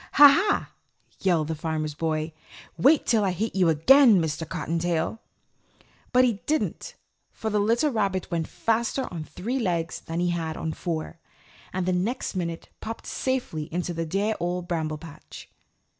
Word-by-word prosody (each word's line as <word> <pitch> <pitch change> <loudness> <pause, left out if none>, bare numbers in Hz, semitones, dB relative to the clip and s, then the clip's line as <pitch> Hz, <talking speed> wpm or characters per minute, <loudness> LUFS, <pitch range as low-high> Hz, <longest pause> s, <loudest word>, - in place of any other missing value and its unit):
"Ha, 290 +1 +10
ha!" 370 +9 +2 0.5
yelled 170 -5 +2
the 160 - -1
Farmer's 155 -1 -3
Boy. 155 0 -2 0.4
"Wait 280 - +4
till 220 -3 +3
I 195 - +2
hit 210 +5 -3
you 185 -3 +4
again, 220 - +6
Mr. 160 0 -2
Cottontail." 170 +3 -1 0.9
But 250 +1 +5
he 225 -5 -1
didn't, 310 +1 -1 0.4
for 220 -1 -4
the 210 - +2
little 230 +8 +2
rabbit 195 -5 -1
went 165 -2 -1
faster 230 +3 0
on 165 -3 -4
three 235 +11 -4
legs 170 -7 -1
than 165 +1 -5
he 175 0 +1
had 165 -2 -3
on 160 - -3
four, 165 0 -4 0.5
and 185 -1 -2
the 185 - +1
next 195 +8 -1
minute 170 -2 -4
popped 225 +1 -7
safely 245 - -2
into 175 +1 -2
the 165 0 -3
dear 200 +6 0
Old 175 0 -2
Bramble 160 -3 -2
Patch. 155 -1 -12
175 Hz, 160 wpm, -26 LUFS, 160-225 Hz, 0.9 s, Ha